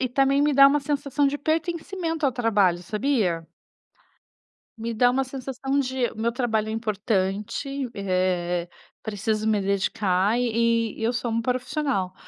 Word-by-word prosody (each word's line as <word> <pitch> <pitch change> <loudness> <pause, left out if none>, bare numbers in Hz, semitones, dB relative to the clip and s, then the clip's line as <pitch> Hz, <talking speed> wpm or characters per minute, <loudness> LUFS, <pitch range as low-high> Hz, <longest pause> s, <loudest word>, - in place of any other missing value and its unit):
e 255 - 0
também 275 +2 +2
me 295 0 +3
dá 275 0 +8
uma 290 +1 +3
sensação 285 0 0
de 290 +1 -3
pertencimento 330 +1 -1
ao 265 - +1
trabalho, 205 -7 +2
sabia? 205 - 0 1.3
Me 230 +1 -4
dá 245 +2 +4
uma 270 +1 +1
sensação 270 +1 -3
de: 260 -2 0
"O - - -11
meu 230 +1 0
trabalho 225 -3 -1
é 220 - -3
importante, 215 +5 -2
eh, 185 -3 -1 0.4
preciso 215 +1 -2
me 210 -2 +2
dedicar, 200 +1 +1
e 230 -2 +1
e - - -4
eu 235 +2 +1
sou 240 0 -2
uma 230 0 0
profissional." 255 -5 -1
235 Hz, 150 wpm, -25 LUFS, 205-275 Hz, 1.3 s, dá